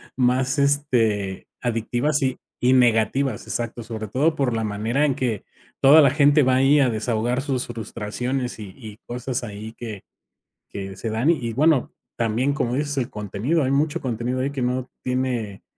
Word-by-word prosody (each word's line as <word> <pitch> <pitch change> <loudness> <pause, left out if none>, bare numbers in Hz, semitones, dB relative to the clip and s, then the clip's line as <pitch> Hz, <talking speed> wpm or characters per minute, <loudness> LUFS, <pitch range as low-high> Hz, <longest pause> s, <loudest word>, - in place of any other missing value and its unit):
más 130 +2 +1
este 115 -9 +1
adictivas 120 +5 0
y 130 -1 0 0.2
y 125 +1 +3
negativas, 120 0 +2
exacto, 120 0 -3
sobre 110 -1 -6
todo 155 +7 +2
por 135 -5 0
la 110 - -1
manera 110 +7 0
en 135 - 0
que 120 -7 -2 0.4
toda 145 +4 +8
la 135 - +5
gente 145 0 +5
va 130 0 +3
ahí 135 +3 +5
a 130 -4 +3
desahogar 120 +3 -1
sus 135 -3 -1
frustraciones 120 +3 -4
y 100 -3 -9
y 110 -4 -10
cosas 125 +1 -3
ahí 110 0 -7
que 110 -5 -8 0.7
que 95 -1 -6
se 110 +4 -4
dan 120 +9 +2
y 170 - +2
y - - -3
bueno, 150 +1 +2 0.2
también 120 +5 +1
como 125 -4 -1
dices: 145 0 -1
"El 130 +1 -1
contenido, 105 - -1
hay 130 - 0
mucho 150 +4 +1
contenido 125 -1 -2
ahí 140 - -1
que 135 -3 -3
no 125 +1 -1
tiene 125 -6 -2
125 Hz, 175 wpm, -23 LUFS, 110-135 Hz, 0.7 s, toda